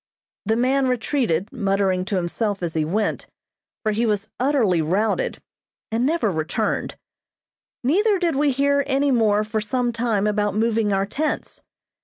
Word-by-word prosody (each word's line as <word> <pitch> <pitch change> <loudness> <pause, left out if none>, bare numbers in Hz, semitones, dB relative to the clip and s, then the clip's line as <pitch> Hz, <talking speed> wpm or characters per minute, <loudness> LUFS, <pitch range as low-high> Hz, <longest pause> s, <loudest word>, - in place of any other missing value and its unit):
The 220 - +3
man 260 +3 +2
retreated, 230 - 0
muttering 195 -5 0
to 200 - -2
himself 195 +2 -2
as 165 -2 -2
he 160 - +1
went, 205 +7 -1 0.6
for 215 - +1
he 225 +3 0
was 210 -1 -1
utterly 245 - +2
routed, 210 - 0 0.5
and 235 +3 +1
never 320 -9 +1
returned; 170 +6 -2 0.9
neither 400 - +3
did 345 -5 0
we 290 +1 +2
hear 280 +2 +2
any 280 +1 +2
more 215 -4 +3
for 215 0 -2
some 240 +3 -1
time 225 -3 0
about 210 -1 0
moving 220 -1 +1
our 195 0 +1
tents. 295 +9 -3
220 Hz, 150 wpm, -22 LUFS, 200-265 Hz, 0.9 s, The